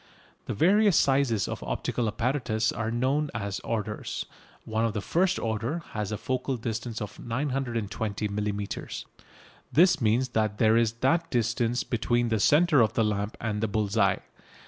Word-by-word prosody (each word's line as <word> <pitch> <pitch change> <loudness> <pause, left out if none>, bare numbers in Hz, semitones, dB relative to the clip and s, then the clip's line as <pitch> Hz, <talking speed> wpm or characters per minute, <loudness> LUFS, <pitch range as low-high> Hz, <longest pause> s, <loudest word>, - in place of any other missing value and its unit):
The - - -2
various 200 - +4
sizes 135 -6 +2
of - - -5
optical 120 - -2
apparatus 115 -1 0
are 110 -1 -3
known 135 +6 0
as 100 -2 -3
"orders." 105 -2 -3 0.4
One 110 0 -1
of 115 -2 0
the 110 - -1
"first 180 - +1
order" 115 +9 -2
has 105 -2 -3
a 105 - -2
focal 130 +2 -2
distance 115 0 -4
of 105 - -9
920 115 -5 -2
millimetres. 105 0 -4 0.7
This 175 -1 +5
means 120 +4 +2
that 110 -3 0
there 110 0 +4
is 115 -1 +3
that 165 +4 +2
distance 120 0 0
between 120 0 0
the 110 -1 +1
centre 150 - +5
of 110 - +2
the 115 - +2
lamp 105 0 -1
and 105 -2 -2
the 110 - +1
bull's 105 0 -1
eye. 100 -3 +2
115 Hz, 160 wpm, -27 LUFS, 105-130 Hz, 0.7 s, This